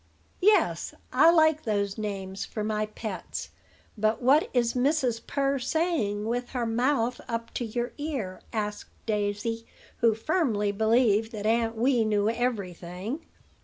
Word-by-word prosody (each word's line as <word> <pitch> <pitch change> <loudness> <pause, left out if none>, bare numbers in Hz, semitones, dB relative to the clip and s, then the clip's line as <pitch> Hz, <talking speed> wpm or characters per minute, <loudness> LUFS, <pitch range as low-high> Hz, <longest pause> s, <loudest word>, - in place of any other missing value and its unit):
"Yes: 420 +3 +3 0.2
I - - +7
like 315 -2 +5
those 200 -2 -1
names 195 -2 -4
for 215 +1 -4
my 215 0 -1
pets. 210 -4 -6 0.4
But 215 0 +1
what 275 +6 +4
is 240 -2 +2
Mrs. 255 -3 +1
Purr 275 -1 0
saying, 250 - 0
with 245 +2 -2
her 245 -2 0
mouth 240 +1 +1
up 230 0 -4
to 240 - -2
your 240 +2 -2
ear?" 265 -12 -4
asked 210 -1 -3 0.2
Daisy, 210 +1 -1 0.3
who 230 -2 +3
firmly 225 - +1
believed 220 +1 +3
that 210 -1 -5
Aunt 225 +1 +2
Wee 240 +1 +3
knew 210 0 +2
every 230 -6 -1
thing. 185 - -6
225 Hz, 140 wpm, -27 LUFS, 210-255 Hz, 0.4 s, I